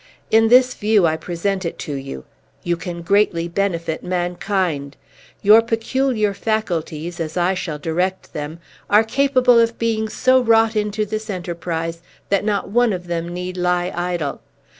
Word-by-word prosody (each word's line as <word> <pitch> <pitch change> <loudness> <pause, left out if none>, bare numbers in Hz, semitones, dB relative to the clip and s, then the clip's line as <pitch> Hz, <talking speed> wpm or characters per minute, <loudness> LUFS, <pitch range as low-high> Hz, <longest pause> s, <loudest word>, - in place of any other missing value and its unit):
In 225 0 +5
this 250 +2 +5
view, 210 -3 +2
I 160 -1 +2
present 185 +4 -2
it 170 - -4
to 145 - -4
you. 135 - -6 0.4
You 175 0 0
can 170 0 -6
greatly 175 -2 +2
benefit 170 -3 -2
mankind. 175 -5 -2 0.5
Your 215 +2 +8
peculiar 225 -1 0
faculties, 175 -6 -3
as 160 +1 -4
I 180 +2 +2
shall 175 -5 -4
direct 180 +5 -2
them, 150 +2 -5 0.3
are 210 +2 +6
capable 255 0 +3
of 230 0 +2
being 220 -1 -1
so 255 +3 +3
wrought 225 -1 +3
into 210 0 0
this 215 +2 -5
enterprise 170 -3 -4 0.3
that 200 0 +2
not 205 -2 -1
one 240 +1 +3
of 180 -1 -5
them 170 -1 -3
need 180 +1 -5
lie 180 0 0
idle. 175 -4 -2
185 Hz, 155 wpm, -20 LUFS, 170-220 Hz, 0.5 s, Your